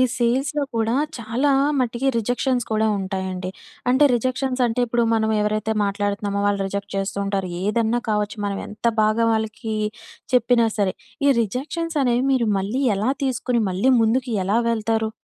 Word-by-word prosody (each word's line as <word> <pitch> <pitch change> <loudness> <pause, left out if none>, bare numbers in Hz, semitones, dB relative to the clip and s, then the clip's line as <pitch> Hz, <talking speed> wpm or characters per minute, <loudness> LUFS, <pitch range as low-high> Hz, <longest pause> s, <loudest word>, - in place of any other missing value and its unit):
సేల్స్‌లో 265 +4 +1
కూడా 225 0 +1 0.2
చాలా 235 +5 0 0.3
మటికి 245 +1 -1
రిజెక్షన్స్ 245 +2 0
కూడా 220 0 +2
ఉంటాయండి. 190 -1 -3 0.4
అంటే 260 +4 +4
రిజెక్షన్స్ 255 +2 -1
అంటే 225 +2 -2
ఇప్పుడు 235 0 +1
మనం 220 -1 +1
ఎవరైతే 215 +1 0
మాట్లాడుతున్నామో, 200 0 -1
వాళ్ళు 200 -1 0
రిజెక్ట్ 200 +1 -5
చేస్తూంటారు, 195 -1 -2
ఏదన్నా 225 +3 +1
కావచ్చు, 210 0 -1
మనం 200 -1 -2
ఎంత 210 +2 -9 0.2
బాగా 215 +2 +2
వాళ్ళకి 220 0 -3 0.6
చెప్పినా 240 -1 +4
సరే. 195 -3 +1 0.3
ఈ - - +5
రిజెక్షన్స్ 300 - -3
అనేవి 245 0 +2
మీరు 240 -3 +1
మళ్ళీ 215 +8 -2
ఎలా 215 +6 +1
తీసుకొని, 250 -2 0
మళ్ళీ 195 +9 +2
ముందుకు 240 +3 +1
ఎలా 205 +4 +2
వెళ్తారు? 220 -1 0
225 Hz, 140 wpm, -22 LUFS, 205-245 Hz, 0.6 s, ఈ